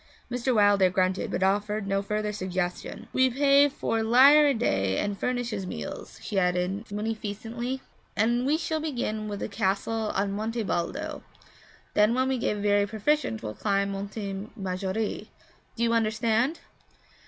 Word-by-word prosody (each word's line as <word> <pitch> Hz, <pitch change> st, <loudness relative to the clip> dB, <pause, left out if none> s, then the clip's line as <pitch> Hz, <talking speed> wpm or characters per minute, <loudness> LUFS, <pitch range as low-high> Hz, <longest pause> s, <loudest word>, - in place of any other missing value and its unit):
Mr. 245 Hz, +1 st, 0 dB
Wilder 205 Hz, -3 st, +5 dB
grunted, 185 Hz, +1 st, 0 dB
but 185 Hz, -, -1 dB
offered 205 Hz, +2 st, +1 dB
no 195 Hz, 0 st, 0 dB
further 210 Hz, +1 st, -2 dB
suggestion. 185 Hz, +3 st, -4 dB
'We 260 Hz, 0 st, +4 dB
pay 280 Hz, +2 st, +5 dB
four 225 Hz, -4 st, -1 dB
lire 270 Hz, +7 st, +7 dB
a 280 Hz, -, +3 dB
day 95 Hz, -, +1 dB
and 205 Hz, 0 st, -1 dB
furnish 245 Hz, +2 st, -2 dB
his 195 Hz, -3 st, -4 dB
meals,' -, -, -7 dB
she 200 Hz, -, 0 dB
added 180 Hz, +4 st, -1 dB
munificently. 225 Hz, +4 st, -4 dB, 0.3 s
'And 240 Hz, +4 st, +2 dB
we 300 Hz, +2 st, +3 dB
shall 320 Hz, -1 st, -2 dB
begin 240 Hz, -8 st, -3 dB
with 205 Hz, -1 st, -5 dB
the -, -, -2 dB
castle 210 Hz, +2 st, -1 dB
on 195 Hz, +1 st, 0 dB
Monte 220 Hz, +3 st, -2 dB
Baldo; 175 Hz, -3 st, -3 dB, 0.7 s
then 210 Hz, +3 st, +4 dB
when 260 Hz, +1 st, +1 dB
we 260 Hz, -1 st, 0 dB
get 210 Hz, -, 0 dB
very 205 Hz, 0 st, +2 dB
proficient 220 Hz, -, 0 dB
we'll 105 Hz, -1 st, -4 dB
climb 200 Hz, -, 0 dB
Monte 200 Hz, 0 st, -5 dB
Maggiore. 190 Hz, +2 st, -3 dB, 0.5 s
Do 235 Hz, -, -1 dB
you 230 Hz, 0 st, +2 dB
understand?' 225 Hz, +5 st, +1 dB
215 Hz, 155 wpm, -27 LUFS, 195-240 Hz, 0.7 s, lire